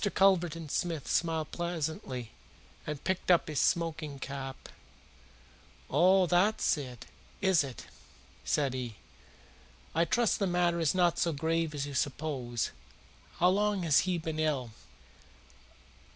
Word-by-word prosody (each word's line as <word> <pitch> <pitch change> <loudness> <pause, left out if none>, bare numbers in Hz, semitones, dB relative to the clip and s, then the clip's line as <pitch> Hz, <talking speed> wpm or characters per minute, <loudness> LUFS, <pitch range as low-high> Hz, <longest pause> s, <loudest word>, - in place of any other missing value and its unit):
Mr. 205 - +1
Culverton 175 -4 +2
Smith 165 0 -2
smiled 160 -2 0
pleasantly 155 -8 -4 0.6
and 150 -2 -4
picked 185 0 -2
up 175 -2 +5
his 150 -2 -1
smoking 160 -4 0
cap. 135 0 -6 1.2
"Oh, 185 +1 +5
that's 180 +5 +3
it 130 -5 -8 0.3
is 190 -6 +4
it?" 130 -6 -8 0.6
said 140 -4 +1
he. 125 -4 -4 1.0
"I 165 +2 +3
trust 235 +4 +2
the 200 - +1
matter 175 -1 +1
is 165 +1 +1
not 175 -2 +3
so 170 - +2
grave 160 +1 -1
as 140 -1 -2
you 145 - -7
suppose. 130 -4 -2 0.7
How 180 - +5
long 205 0 +1
has 155 -5 +5
he 180 - +1
been 160 -1 -4
ill?" 140 -7 0
160 Hz, 130 wpm, -31 LUFS, 140-175 Hz, 1.2 s, up